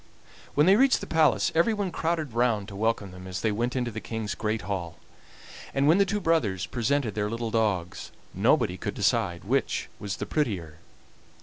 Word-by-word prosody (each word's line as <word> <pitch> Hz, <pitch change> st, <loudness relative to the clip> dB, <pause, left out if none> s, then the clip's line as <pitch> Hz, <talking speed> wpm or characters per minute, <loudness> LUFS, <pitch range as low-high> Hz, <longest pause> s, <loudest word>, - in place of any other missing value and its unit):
When 150 Hz, -, +5 dB
they 195 Hz, +3 st, +6 dB
reached 270 Hz, +2 st, +4 dB
the -, -, -6 dB
palace 160 Hz, -2 st, +3 dB
everyone 200 Hz, +2 st, +1 dB
crowded 160 Hz, -6 st, -2 dB
round 115 Hz, -4 st, +1 dB
to 100 Hz, -, -9 dB
welcome 110 Hz, -2 st, -1 dB
them 90 Hz, +1 st, -10 dB
as 95 Hz, 0 st, -4 dB
they 110 Hz, -, +1 dB
went 120 Hz, +5 st, -1 dB
into 120 Hz, -2 st, -1 dB
the 110 Hz, 0 st, -6 dB
King's 110 Hz, +1 st, -4 dB
great 110 Hz, -1 st, -2 dB
hall; 95 Hz, -4 st, -4 dB, 0.8 s
and 140 Hz, +1 st, +3 dB
when 165 Hz, +5 st, +5 dB
the 200 Hz, -, +4 dB
two 210 Hz, -, 0 dB
brothers 140 Hz, -, +1 dB
presented 125 Hz, -1 st, 0 dB
their 105 Hz, -1 st, -1 dB
little 115 Hz, 0 st, -3 dB
dogs 95 Hz, -6 st, -1 dB, 0.2 s
nobody 90 Hz, -, +2 dB
could 100 Hz, 0 st, -4 dB
decide 95 Hz, -2 st, 0 dB
which -, -, -1 dB
was 100 Hz, -3 st, -4 dB
the -, -, -4 dB
prettier. 90 Hz, -, -2 dB
110 Hz, 185 wpm, -27 LUFS, 100-150 Hz, 0.8 s, they